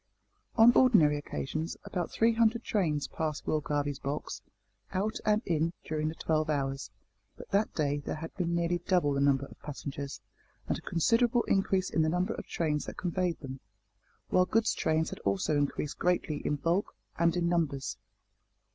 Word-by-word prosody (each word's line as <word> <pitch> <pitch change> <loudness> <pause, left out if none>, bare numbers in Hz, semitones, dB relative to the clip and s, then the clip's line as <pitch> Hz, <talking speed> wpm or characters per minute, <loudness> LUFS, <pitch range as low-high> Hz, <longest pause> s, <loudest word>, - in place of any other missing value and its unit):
On 235 +1 +8
ordinary 205 - +5
occasions 155 +3 -4
about 175 -2 -3
three 230 +1 +3
hundred 230 +1 +2
trains 155 -9 0
passed 155 -2 -3
Will 155 - +1
Garvie's 145 -1 -1
box, 145 +2 -4 0.5
out 210 +4 -1
and 215 +2 +3
in, 165 0 +1
during 155 0 -1
the 160 - -3
twelve 155 -1 0
hours, 135 -2 -1 0.5
but - - -12
that 205 +2 +2
day 145 -2 +1
there 145 - -4
had 160 +1 -7
been 170 -2 -1
nearly 170 +1 +1
double 175 -6 +3
the 140 - 0
number 140 -1 +3
of - - -15
passengers, 140 -1 -6 0.5
and - - 0
a - - -14
considerable 230 +7 +2
increase 195 -1 +1
in 160 - +2
the 155 - +2
number 180 +3 0
of - - -8
trains 150 -3 -1
that - - -8
conveyed 180 -1 -1
them, 135 -2 -7 0.7
while 180 - +4
goods 225 0 +2
trains 160 0 0
had - - -7
also 100 +9 0
increased 145 0 -1
greatly 175 -4 +1
in 150 - 0
bulk 170 +7 0 0.2
and 170 0 +3
in 175 -1 +1
numbers. 160 -6 0
160 Hz, 175 wpm, -30 LUFS, 145-185 Hz, 0.7 s, On